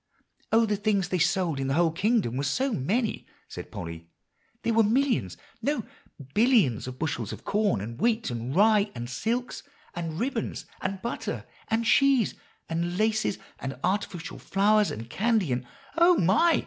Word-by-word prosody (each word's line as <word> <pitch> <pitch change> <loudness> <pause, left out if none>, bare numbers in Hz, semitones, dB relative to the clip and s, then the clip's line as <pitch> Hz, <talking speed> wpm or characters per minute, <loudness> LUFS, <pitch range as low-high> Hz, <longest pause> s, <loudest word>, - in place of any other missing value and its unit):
"Oh! 225 +1 +5
the 210 -2 0
things 205 -3 +1
they 185 - 0
sold 175 -4 +1
in 135 - -1
the 135 - 0
whole 170 -1 +3
kingdom 195 - +1
were 135 - -1
so 260 - 0
many," 215 - -1 0.2
said - - -8
Polly; 85 -1 -7 0.5
"there 230 - +1
were 225 - +5
millions 225 - +1 0.2
no, 280 0 0 0.5
billions 210 - +3
of 130 0 -6
bushels 160 0 -2
of - - -8
corn, 205 - +1
and 115 +3 -7
wheat 230 - +1
and 120 +3 -4
rye 210 +1 +4
and 120 0 -5
silks 230 - -2 0.3
and 165 -1 -4
ribbons 260 +5 -2 0.2
and 195 -1 -3
butter 235 - -4 0.2
and 225 +1 0
cheese, 270 -2 +4 0.3
and 170 +2 -2
laces 215 -1 +1 0.2
and 135 -1 -5
artificial 185 -3 -2
flowers 210 +1 +3
and 115 +1 -6
candy, 215 - +1
and" 125 0 -3 0.3
"Oh, 340 +2 +5
my!" 220 - +4
200 Hz, 160 wpm, -27 LUFS, 145-225 Hz, 0.5 s, Oh